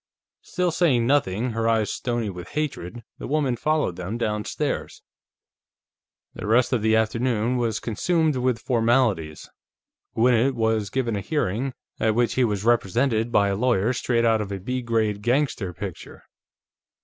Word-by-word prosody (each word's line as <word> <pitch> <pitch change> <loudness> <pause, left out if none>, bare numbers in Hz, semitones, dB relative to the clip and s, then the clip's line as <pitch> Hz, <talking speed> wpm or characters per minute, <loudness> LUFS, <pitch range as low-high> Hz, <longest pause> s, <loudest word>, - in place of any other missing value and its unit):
Still 180 -1 -1
saying 145 -9 +2
nothing, 120 -3 +1
her 115 0 0
eyes 110 -2 +1
stony 120 -4 -2
with 90 -1 -9
hatred, 120 - -3 0.2
the - - -6
woman 140 -3 +1
followed 150 - 0
them 95 +5 -4
downstairs. 105 -2 -3 1.3
The - - -6
rest 120 +4 +3
of 120 - +1
the 110 +1 +3
afternoon 115 +2 +1
was 115 -3 -1
consumed 155 - 0
with 125 -1 +1
formalities. 115 - 0 0.7
Gwinnett 125 +3 +3
was 110 -3 0
given 120 -4 -1
a 100 - -2
hearing, 125 - -2 0.2
at 110 -1 +1
which 120 0 +2
he 130 - +2
was 105 -4 -1
represented 120 +1 +1
by 100 -3 +3
a 100 - 0
lawyer 115 0 +1
straight 120 -1 0
out 110 -1 +3
of 100 -1 -5
a 100 - -4
B 125 +7 -3
grade 110 -3 0
gangster 120 -5 0
picture. 95 0 -8
115 Hz, 150 wpm, -24 LUFS, 105-125 Hz, 1.3 s, rest